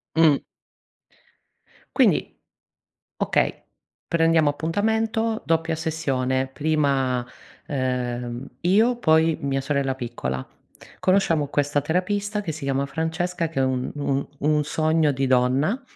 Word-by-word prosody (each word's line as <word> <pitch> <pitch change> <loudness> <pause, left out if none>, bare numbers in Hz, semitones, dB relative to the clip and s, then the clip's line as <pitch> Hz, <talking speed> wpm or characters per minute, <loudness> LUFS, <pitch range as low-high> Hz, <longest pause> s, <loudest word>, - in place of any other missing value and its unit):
Mh. 160 -3 +5 1.5
Quindi - - +3 0.8
okay, - - 0 0.4
prendiamo 165 -2 +3
appuntamento, 220 +8 0
doppia 165 +1 +1
sessione, 135 -5 -1
prima, 135 -3 0 0.4
ehm, 125 -2 -2
io 220 +8 +3
poi 160 -5 +3
mia 135 -2 -1
sorella 135 -1 0
piccola. 115 - -4 0.5
Conosciamo 170 -6 +2
questa 145 0 +1
terapista 200 +7 -1
che 170 -5 -3
si 155 -1 -7
chiama 135 0 0
Francesca, 165 +3 -2
che 155 -4 -3
è - - +4
un 130 -1 -1
un 140 -1 -1
un 150 0 +2
sogno 155 +1 +2
di 135 -1 0
donna, 130 - +2
150 Hz, 110 wpm, -24 LUFS, 135-165 Hz, 1.5 s, Mh